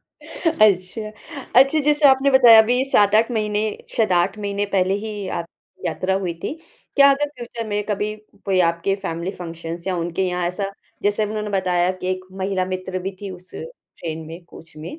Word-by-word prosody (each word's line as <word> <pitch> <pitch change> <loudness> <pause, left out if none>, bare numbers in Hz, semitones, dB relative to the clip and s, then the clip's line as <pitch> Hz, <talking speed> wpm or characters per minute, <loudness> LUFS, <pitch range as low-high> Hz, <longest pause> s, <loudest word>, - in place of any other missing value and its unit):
अच्छा, 215 - 0 0.5
अच्छा, 270 +4 +6
जैसे 295 0 +4
आपने 270 +1 +4
बताया 245 -4 +8
अभी 250 +4 +1
7-8 215 +2 +4
महीने 210 -2 -1 0.3
शायद 220 -5 +2
8 180 +4 +1
महीने 200 0 -2
पहले 190 0 +2
ही 210 -3 -5
आपकी 170 0 -10
यात्रा 190 +1 -1
हुई 175 -3 -2
थी। - - -3 0.4
क्या 280 0 +8
अगर 290 +1 +1
फ्यूचर 235 -2 -6
में 205 0 -1
कभी 210 0 -2 0.3
कोई 190 -2 +2
आपके 170 +3 -1
फैमिली 170 +3 -3
फंक्शन्स 170 0 -7
या 185 -2 -1
उनके 170 +2 -2
यहाँ 180 -1 -1
ऐसा 195 +3 -3 0.3
जैसे 205 +1 +1
उन्होंने 210 0 -4
बताया 180 -2 +1
कि 185 - -4
1 185 0 -3 0.2
महिला 190 -1 0
मित्र 185 0 -3
भी 195 - -4
थी 200 - -6
उस 180 0 -12
ट्रेन 165 - -8
में, 165 +2 -10
कोच 165 -1 -15
में, 165 - -8
200 Hz, 175 wpm, -21 LUFS, 180-220 Hz, 0.5 s, बताया